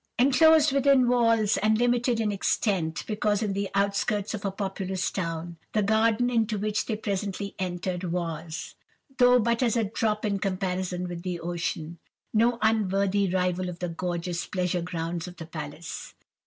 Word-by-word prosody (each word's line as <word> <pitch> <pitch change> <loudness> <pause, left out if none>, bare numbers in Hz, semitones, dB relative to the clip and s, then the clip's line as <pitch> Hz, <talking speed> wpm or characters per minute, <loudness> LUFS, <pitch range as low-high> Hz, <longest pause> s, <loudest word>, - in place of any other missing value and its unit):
"Enclosed 305 +4 +5
within 275 -2 +4
walls, 230 -3 +3
and 215 0 +2
limited 245 0 +2
in 215 -2 +1
extent, 190 -4 0
because 210 0 0
in 205 -2 -1
the 200 0 -2
outskirts 200 +1 0
of 210 - -5
a 200 - 0
populous 190 -1 -3
town, 170 -2 -4 0.2
the 215 - +2
garden 220 +3 +3
into 225 -3 +1
which 210 +1 -1
they 220 - -1
presently 200 -1 -3
entered, 180 0 -3
was—though 175 - -1
but 235 0 +1
as 240 -2 +2
a 230 - +2
drop 215 +1 -1
in 200 -2 0
comparison 185 -2 -2
with 175 -1 -6
the 180 -1 -3
ocean—no 175 +7 -2
unworthy 200 -2 +2
rival 180 0 0
of 175 - -7
the 180 0 -3
gorgeous 175 0 -3
pleasure 180 -1 -1
grounds 170 0 -4
of 180 -1 -10
the 165 - -7
palace. 160 0 -7
195 Hz, 155 wpm, -27 LUFS, 180-220 Hz, 0.2 s, Enclosed